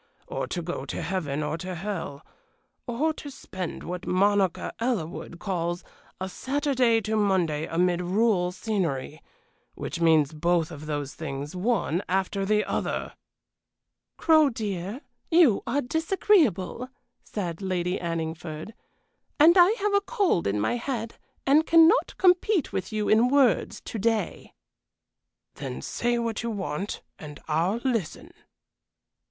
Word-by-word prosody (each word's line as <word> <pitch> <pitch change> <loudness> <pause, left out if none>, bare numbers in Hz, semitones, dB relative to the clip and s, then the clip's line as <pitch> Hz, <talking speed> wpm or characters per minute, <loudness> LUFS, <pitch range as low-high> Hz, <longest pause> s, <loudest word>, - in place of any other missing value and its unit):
or - - -4
to 175 - -3
go 175 +2 -4
to - - -5
heaven 155 -6 -2
or 150 +2 -3
to 185 +1 -5
hell? 175 -6 -5 0.6
or 285 +7 0
to 290 - -8
spend 185 -9 -6
what 180 0 -6
Monica 195 -1 +2
Ellerwood 195 -8 -3
calls 175 -2 -2 0.4
'a 190 - -3
Saturday 260 0 +1
to 220 +1 -2
Monday 180 -7 +1
amid 175 +1 +1
rural 185 -1 +2
scenery,' 165 - -2 0.5
which 170 - -5
means 160 -3 +4
both 170 +1 +1
of 155 -1 -9
those 145 -2 -3
things 145 +1 -6
one 190 -3 0
after 195 +1 0
the 210 0 +2
other!" - - -2 1.0
"Crow, 315 -3 +5
dear, 210 0 -4 0.3
you 325 - +5
are 275 +5 +1
disagreeable," 285 - +1 0.3
said 175 -4 -4
Lady 185 -1 -1
Anningford, 165 +1 -4 0.7
"and 325 +4 +7
I 355 0 +7
have 415 0 +1
a 400 - +4
cold 400 - +1
in 100 +1 0
my 175 - 0
head 235 -2 -4 0.3
and 295 +4 +4
cannot 330 +8 +5
compete 365 - +3
with 185 +2 -3
you 215 -1 -1
in 225 +3 +5
words 270 -3 +2
to 225 - -6
day." 225 +1 -1 1.0
"Then - - -6
say 240 0 0
what 230 -2 -2
you 235 - -3
want, 195 -2 -4 0.2
and 150 -1 -9
I'll 170 +8 +1
listen." 230 - -2
195 Hz, 135 wpm, -26 LUFS, 170-245 Hz, 1.0 s, and